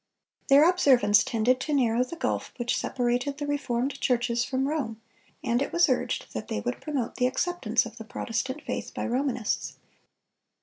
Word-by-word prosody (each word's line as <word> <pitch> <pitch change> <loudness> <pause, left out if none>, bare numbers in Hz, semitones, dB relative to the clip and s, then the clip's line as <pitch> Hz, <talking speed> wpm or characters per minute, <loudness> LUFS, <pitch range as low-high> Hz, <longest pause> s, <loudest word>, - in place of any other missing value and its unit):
Their 285 +4 +7
observance 250 - +5
tended 245 +2 +1
to 300 +2 -1
narrow 240 -2 +3
the 255 +7 -7
gulf - - -2
which 240 -1 0
separated 250 +2 -1
the 295 - -3
reformed 275 -2 -2
churches 240 -1 +1
from 265 +1 -1
Rome, 260 -8 -2 0.4
and 240 +2 +1
it 280 - -2
was 345 0 +4
urged 255 - -1
that 110 - -5
they 105 - -2
would 120 +4 -4
promote 275 -6 -3
the 250 - +3
acceptance 255 -6 0
of 235 0 -10
the 225 - -7
Protestant 260 +6 -4
faith - - -5
by - - -2
Romanists. 250 -2 -1
250 Hz, 170 wpm, -27 LUFS, 235-280 Hz, 0.4 s, Their